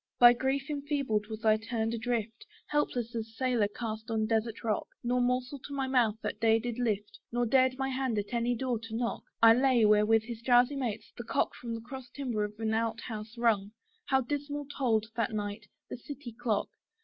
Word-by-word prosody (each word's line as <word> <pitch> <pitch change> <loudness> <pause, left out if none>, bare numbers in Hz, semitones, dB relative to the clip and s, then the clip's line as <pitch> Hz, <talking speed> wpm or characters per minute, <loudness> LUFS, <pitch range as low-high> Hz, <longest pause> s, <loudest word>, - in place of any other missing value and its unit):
By 240 0 +9
grief 265 +3 -1
enfeebled 280 -8 -1
was 220 +1 -7
I 215 0 +5
turned 225 0 -2
adrift, 230 -1 -3 0.2
Helpless 250 -5 -1
as 225 -1 -5
sailor 245 -5 +2
cast 220 +1 -5
on 220 -1 +1
desart 225 0 -1
rock; 215 -3 0 0.2
Nor 245 +1 +1
morsel 250 +3 0
to 280 +2 -7
my 270 -1 -1
mouth 245 -5 +3
that - - -3
day 225 0 +4
did 240 +1 -4
lift, 210 -4 -1
Nor 240 0 +1
dared 260 +1 +3
my 270 0 -1
hand 260 -3 -1
at 205 +3 -3
any 240 +1 +1
door 245 -1 -1
to 225 0 -7
knock. 235 0 -1 0.2
I 225 0 +10
lay, 250 -2 +4
where 210 0 +5
with 225 0 +4
his 230 0 -7
drowsy 245 +3 +4
mates, 245 -6 -4
the - - -6
cock - - 0
From 235 -1 -5
the 225 - -6
cross 255 +1 -9
timber 245 -6 -2
of 210 0 -4
an 220 -1 0
out 225 0 0
house 220 -1 -7
hung; 215 -4 +1 0.3
How 265 0 +3
dismal 290 +2 -3
tolled, 225 -5 +2
that 230 -1 0
night, 210 0 -4 0.2
the - - -4
city 265 0 -8
clock! 220 -2 -1
235 Hz, 205 wpm, -30 LUFS, 220-255 Hz, 0.3 s, I